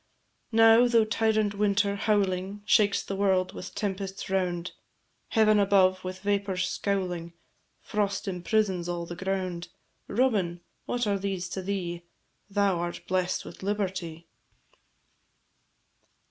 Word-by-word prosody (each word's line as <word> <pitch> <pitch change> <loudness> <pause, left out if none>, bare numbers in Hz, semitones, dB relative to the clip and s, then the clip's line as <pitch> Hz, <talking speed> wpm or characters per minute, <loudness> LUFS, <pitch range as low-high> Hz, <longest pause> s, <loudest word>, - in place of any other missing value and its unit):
Now, 225 +1 +6
though 230 -2 +4
tyrant 215 -1 +1
Winter, 200 0 +1
howling, 200 -1 0
Shakes 210 -1 +3
the 195 - -4
world 190 -2 +1
with 185 - -8
tempests 195 -1 -4
round, 180 -2 -1 0.6
Heaven 215 -2 +4
above 190 -2 +3
with 185 0 -6
vapours 200 -2 0
scowling, 180 -4 -2 0.5
Frost 200 -1 -2
imprisons 185 -1 0
all 170 -1 -3
the 175 - -7
ground: 185 -2 -3 0.4
Robin! 200 -8 +1 0.3
what 245 -1 0
are 200 -1 0
these 190 -2 -3
to 190 - -4
thee? 180 -3 -3 0.5
Thou 200 -3 +1
art 175 0 -4
bless'd 185 0 0
with - - -11
liberty. 185 -5 -3
195 Hz, 120 wpm, -28 LUFS, 185-205 Hz, 0.6 s, Now